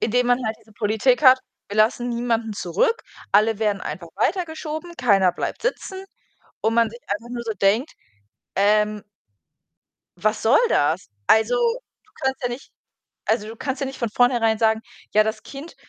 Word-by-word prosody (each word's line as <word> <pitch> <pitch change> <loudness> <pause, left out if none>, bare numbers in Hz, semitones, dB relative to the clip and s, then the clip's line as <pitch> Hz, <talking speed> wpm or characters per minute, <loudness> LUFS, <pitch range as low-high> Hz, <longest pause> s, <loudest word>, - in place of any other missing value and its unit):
indem 245 +2 +1
man 245 +1 +2
halt 220 0 -2
diese 220 - -22
Politik 220 +6 +1
hat: 260 -2 +8 0.3
„Wir 205 - -6
lassen 230 +3 +2
niemanden 235 -2 -1
zurück. 190 - 0 0.3
Alle 215 +1 +4
werden 210 -3 0
einfach 170 -2 -6
weitergeschoben. 320 - -2
Keiner 195 -7 +3
bleibt - - -4
sitzen“, 385 -5 -3 0.6
und 220 - +1
man 230 -1 +3
sich 235 +2 -12
einfach 210 +4 -4
nur 240 -1 -5
so 225 -2 -3
denkt, 205 - +1 0.6
ähm 210 +1 +2 1.2
„Was 215 +1 0
soll 225 +4 +5
das?“ 160 - +1 0.2
Also, 220 - +4
du 475 -3 -3
kannst 265 0 -1
ja 245 - 0
nicht 240 +3 -8 0.6
also, 215 -1 +1
du 225 - -8
kannst 265 +3 -4
ja 275 - -1
nicht 265 0 -7
von 235 -3 -2
vornherein 235 -2 +2
sagen: 220 0 +2 0.3
„Ja, 215 - +6
das 220 0 -3
Kind“ 285 +4 -10
230 Hz, 165 wpm, -23 LUFS, 215-260 Hz, 1.2 s, hat